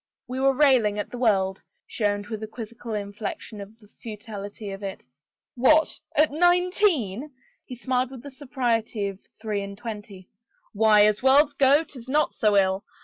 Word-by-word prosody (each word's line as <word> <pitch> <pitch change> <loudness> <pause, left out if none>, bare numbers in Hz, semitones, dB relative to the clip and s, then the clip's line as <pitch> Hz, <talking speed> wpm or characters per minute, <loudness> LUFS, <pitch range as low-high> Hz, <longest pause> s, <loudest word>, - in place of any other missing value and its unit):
"We 255 +1 -4
were 270 0 +3
railing 255 -8 +4
at 205 - -4
the 245 - -7
world," 195 -5 +1 0.2
she 215 - -3
owned 205 0 0
with 220 -1 -6
a. 220 - -5
quizzical 230 0 -7
inflection 205 +1 -6
at 205 +3 -11
the 210 - -20
futility 210 -2 -7
of 195 +1 -8
it. 195 -8 -7 0.3
" - - -69
What 310 +2 +4
— - - -37
at 310 - -1
nineteen? 350 - +2 0.2
" - - -42
he 250 - -7
smiled 255 +1 -1
with 260 -2 -11
the 285 - -9
superiority 240 -6 -2
of 195 -1 -10 0.2
three 215 -2 -2
and 200 0 -7
twenty. 210 -4 -8 0.2
" - - -40
Why, 210 -1 +5
as 210 -1 +2
worlds 280 +3 +5
go, 280 +3 +4
'tis 255 -6 -12
not 300 +3 +1
so 210 -3 +2
ill. 190 0 +2
225 Hz, 190 wpm, -25 LUFS, 205-265 Hz, 0.3 s, Why